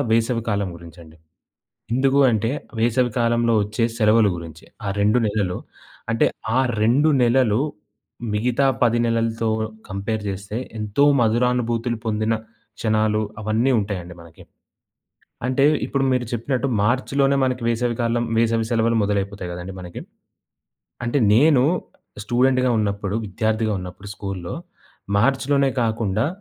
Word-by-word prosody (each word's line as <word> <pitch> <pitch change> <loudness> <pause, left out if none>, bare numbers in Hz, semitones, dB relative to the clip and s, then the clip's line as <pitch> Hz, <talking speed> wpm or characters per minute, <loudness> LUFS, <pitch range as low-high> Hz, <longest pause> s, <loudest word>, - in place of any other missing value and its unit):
వేసవి 115 0 +1
కాలం 100 -2 0
గురించి 85 +1 -13
అండి. 80 0 -16 0.8
ఎందుకు 135 +2 +2
అంటే 115 +1 0 0.3
వేసవి 120 +2 +2
కాలంలో 115 -1 +2
వచ్చే 110 +3 -1
సెలవుల 110 -1 +4
గురించి. 85 -1 -9 0.2
ఆ - - -1
2 105 +4 +3
నెలలు 100 -4 -1 0.5
అంటే, 115 - +3 0.3
ఆ - - +5 0.2
2 135 +8 +4
నెలలు, 120 -2 +3 0.7
మిగతా 125 +5 +1 0.2
10 120 0 +3
నెలలతో 115 0 0 0.4
కంపేర్ 105 +3 -3
చేస్తే 100 +3 -5 0.2
ఎంతో 105 +7 +1 0.2
మధురానుభూతులు 120 0 +1
పొందిన 110 +1 0 0.5
క్షణాలు 110 -1 +1 0.2
అవన్నీ 110 +5 +1
ఉంటాయండి 90 -4 -5
మనకి. 85 -1 -15 1.0
అంటే 130 +2 +1 0.2
ఇప్పుడు 140 -1 -1
మీరు 125 -1 +1
చెప్పినట్టు 130 +3 -1 0.2
మార్చిలోనే 135 +4 +2
మనకి 125 -1 -2
వేసవి 120 0 0
కాలం 120 0 0
వేసవి 115 -1 +1
సెలవులు 115 0 +2
మొదలైపోతాయి 100 -2 -2
కదండీ 90 +2 -7
మనకి. 90 -1 -8 1.0
అంటే 120 +4 +1 0.2
నేను 140 +1 +5 0.6
స్టూడెంట్‌గా 130 +2 +2
ఉన్నప్పుడు 100 -1 -2
విద్యార్థిగా 110 +2 -1
ఉన్నప్పుడు 90 +3 -9
స్కూల్‌లో 95 -4 -5 0.6
మార్చ్‌లోనే 135 +3 +2
కాకుండా 110 0 0
115 Hz, 120 wpm, -22 LUFS, 105-125 Hz, 1.0 s, ఆ